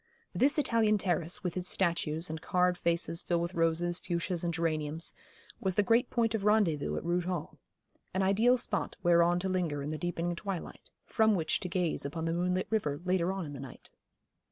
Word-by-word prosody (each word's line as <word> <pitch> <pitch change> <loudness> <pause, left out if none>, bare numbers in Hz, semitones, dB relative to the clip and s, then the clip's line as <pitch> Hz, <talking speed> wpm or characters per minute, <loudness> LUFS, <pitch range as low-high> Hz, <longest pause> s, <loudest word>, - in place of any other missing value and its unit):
This 285 +4 +3
Italian 230 -6 +3
terrace, 175 -3 -1
with 180 - -2
its 185 0 -1
statues, 170 -2 0
and 160 0 -5
carved 180 0 +1
vases 170 0 0
filled 170 -1 0
with 170 +2 -4
roses, 170 +1 +1
fuchsias, 175 0 -2
and 170 - 0
geraniums, 160 -1 -2 0.5
was 190 -2 -1
the 205 - +4
great 230 +4 +3
point 230 -2 +1
of 220 -3 -1
rendezvous 205 -8 +2
at - - -4
Rood 175 0 0
Hall 180 -1 -4 0.5
an 190 - 0
ideal 220 +6 +4
spot 210 -4 -2
whereon 175 0 +4
to 190 - -1
linger 170 -6 -1
in 145 - -4
the 155 0 -4
deepening 175 0 -2
twilight, 190 -1 -6 0.2
from 220 -2 +3
which 160 -4 0
to 180 - -5
gaze 175 -2 -1
upon 160 +4 -4
the 165 - 0
moonlit 180 +2 0
river 150 -10 0
later 180 -1 +1
on 190 -2 -3
in 145 - -7
the 140 - -7
night. 135 -1 -10
175 Hz, 195 wpm, -31 LUFS, 165-195 Hz, 0.5 s, the